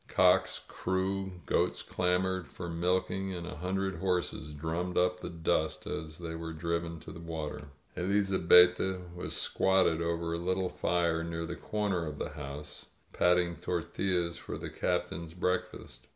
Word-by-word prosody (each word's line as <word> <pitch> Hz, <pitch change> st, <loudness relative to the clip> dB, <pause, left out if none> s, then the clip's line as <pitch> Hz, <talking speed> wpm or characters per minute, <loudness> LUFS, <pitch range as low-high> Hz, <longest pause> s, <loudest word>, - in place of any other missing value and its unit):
Cocks -, -, +4 dB
crew, 95 Hz, +1 st, -1 dB
goats -, -, +1 dB
clamored 90 Hz, -1 st, 0 dB
for 85 Hz, +5 st, -7 dB
milking, 90 Hz, +3 st, 0 dB
and 85 Hz, -1 st, -5 dB
a 90 Hz, -2 st, -6 dB
hundred 95 Hz, +3 st, -1 dB
horses 90 Hz, -4 st, -1 dB
drummed 80 Hz, +4 st, -2 dB
up 90 Hz, 0 st, +3 dB
the -, -, -5 dB
dust 80 Hz, -1 st, 0 dB
as 80 Hz, -1 st, -5 dB
they 85 Hz, -1 st, -5 dB
were 80 Hz, 0 st, -5 dB
driven 85 Hz, +1 st, -2 dB
to -, -, -9 dB
water. 80 Hz, -3 st, -5 dB, 0.3 s
Elizabetta 95 Hz, -1 st, +5 dB
was 90 Hz, -, -3 dB
squatted 95 Hz, -4 st, +3 dB
over 85 Hz, 0 st, -1 dB
a -, -, 0 dB
little 95 Hz, +1 st, 0 dB
fire 85 Hz, -2 st, +1 dB
near 85 Hz, 0 st, -3 dB
the -, -, -4 dB
corner 100 Hz, -6 st, -1 dB
of 75 Hz, -1 st, -5 dB
the -, -, -3 dB
house, 75 Hz, +1 st, -7 dB, 0.3 s
patting 90 Hz, -1 st, +3 dB
tortillas 85 Hz, 0 st, -1 dB
for -, -, -6 dB
the -, -, -6 dB
Captain's 80 Hz, 0 st, -2 dB
breakfast. 90 Hz, 0 st, -2 dB
90 Hz, 145 wpm, -31 LUFS, 85-95 Hz, 0.3 s, Elizabetta